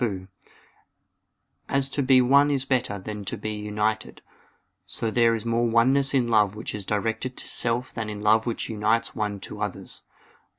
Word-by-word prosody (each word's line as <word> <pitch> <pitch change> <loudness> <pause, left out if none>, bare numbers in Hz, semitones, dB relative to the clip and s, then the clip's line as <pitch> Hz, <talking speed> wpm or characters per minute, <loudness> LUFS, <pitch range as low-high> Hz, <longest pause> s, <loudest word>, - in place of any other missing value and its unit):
2: 95 -5 -2 1.4
As 135 -1 +2
to 140 - -1
be 130 -1 +5
one 140 +3 +5
is 135 -2 0
better 125 -6 0
than 105 +1 -6
to - - -3
be 110 +1 -4
united, 105 +1 -2 0.6
so 115 - -2
there 115 0 +3
is 115 - -5
more 115 +1 +1
oneness 135 +4 +3
in 125 -3 +2
love 105 -3 +3
which 110 - -5
is 105 -2 -5
directed 115 +4 -2
to - - -4
self 120 +1 -2
than 110 -2 -4
in 105 -1 -5
love 110 +2 +3
which 115 - -2
unites 110 +1 0
one 105 -2 -3
to - - -8
others. - - -5
115 Hz, 175 wpm, -25 LUFS, 105-125 Hz, 1.4 s, be